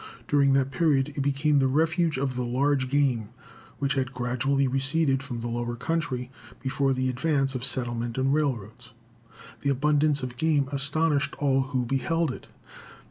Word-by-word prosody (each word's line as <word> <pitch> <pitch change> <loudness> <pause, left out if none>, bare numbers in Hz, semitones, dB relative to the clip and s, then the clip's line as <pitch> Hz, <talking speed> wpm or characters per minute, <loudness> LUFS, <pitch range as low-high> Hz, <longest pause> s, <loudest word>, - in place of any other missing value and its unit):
During 140 -2 +3
that 135 0 +2
period 140 -1 +2
it 145 -1 -4
became 140 +1 +2
the 135 - +3
refuge 160 +2 +1
of 135 -1 -1
the 125 - -2
large 130 +2 +1
game 130 -6 +1 0.5
which 140 0 0
had 135 -1 -2
gradually 130 +3 0
receded 135 +1 +1
from 125 -4 -6
the 120 - -3
lower 120 0 -3
country 130 -3 -2 0.3
before 135 +1 0
the 130 0 0
advance 135 +1 0
of 130 -2 -4
settlement 120 -3 -1
and 135 +1 +2
railroads. 130 -9 -2 0.7
The 140 - 0
abundance 145 +1 +2
of 125 -1 -5
game 150 -2 +2
astonished 145 +1 +1
all 135 -2 +2
who 130 -3 -1
beheld 155 +5 0
it. - - -9
135 Hz, 160 wpm, -26 LUFS, 130-145 Hz, 0.7 s, During